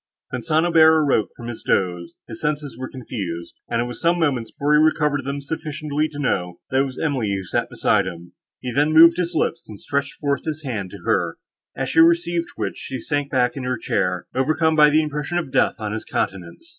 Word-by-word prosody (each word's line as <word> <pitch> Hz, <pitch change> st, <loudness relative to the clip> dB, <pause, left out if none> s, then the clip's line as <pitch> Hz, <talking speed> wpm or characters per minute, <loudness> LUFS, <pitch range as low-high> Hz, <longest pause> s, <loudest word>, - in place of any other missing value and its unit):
When 130 Hz, -, -3 dB
St. 160 Hz, +2 st, +2 dB
Aubert 160 Hz, -2 st, +5 dB
awoke 130 Hz, -7 st, +2 dB
from 120 Hz, -, -9 dB
this 120 Hz, -1 st, -6 dB
doze, 90 Hz, -2 st, -1 dB
his 110 Hz, -1 st, -8 dB
senses 150 Hz, -1 st, -2 dB
were 130 Hz, 0 st, -6 dB
confused, 95 Hz, -10 st, -6 dB
and 115 Hz, -, 0 dB
it -, -, +2 dB
was 120 Hz, 0 st, -7 dB
some 170 Hz, +1 st, +3 dB
moments 135 Hz, -9 st, 0 dB
before 145 Hz, +1 st, 0 dB
he 150 Hz, -, +6 dB
recovered 150 Hz, -2 st, +2 dB
them 140 Hz, +1 st, -3 dB
sufficiently 150 Hz, 0 st, -3 dB
to 150 Hz, -, -10 dB
know, 90 Hz, -11 st, -1 dB
that 130 Hz, +1 st, +3 dB
it -, -, +1 dB
was 130 Hz, -2 st, -7 dB
Emily 130 Hz, -9 st, -1 dB
who 95 Hz, -, -4 dB
sat 85 Hz, -, -2 dB
beside 100 Hz, -3 st, +1 dB
him. 85 Hz, -1 st, -8 dB, 0.3 s
He 125 Hz, -, -4 dB
then 145 Hz, +5 st, +2 dB
moved 165 Hz, +2 st, +8 dB
his 175 Hz, -1 st, -2 dB
lips, 165 Hz, -5 st, -1 dB
and 105 Hz, -2 st, -9 dB
stretched 140 Hz, +1 st, -2 dB
forth 140 Hz, -2 st, -2 dB
his 155 Hz, -1 st, -4 dB
hand 110 Hz, -9 st, -4 dB
to -, -, -11 dB
her; -, -, 0 dB, 0.4 s
as -, -, -2 dB
she -, -, +2 dB
received 170 Hz, +1 st, +3 dB
which, -, -, -3 dB
she 130 Hz, -1 st, -6 dB
sunk 145 Hz, +1 st, -2 dB
back 125 Hz, -3 st, +1 dB
in 135 Hz, -, -5 dB
her 125 Hz, -1 st, -1 dB
chair, 90 Hz, -4 st, -1 dB
overcome 155 Hz, +4 st, +2 dB
by 150 Hz, -1 st, +7 dB
the 155 Hz, +1 st, +3 dB
impression 150 Hz, +3 st, -3 dB
of 160 Hz, -7 st, -3 dB
death -, -, +2 dB
on 105 Hz, -2 st, -4 dB
his 110 Hz, 0 st, -4 dB
countenance. 90 Hz, -3 st, -4 dB
140 Hz, 220 wpm, -22 LUFS, 115-155 Hz, 0.4 s, moved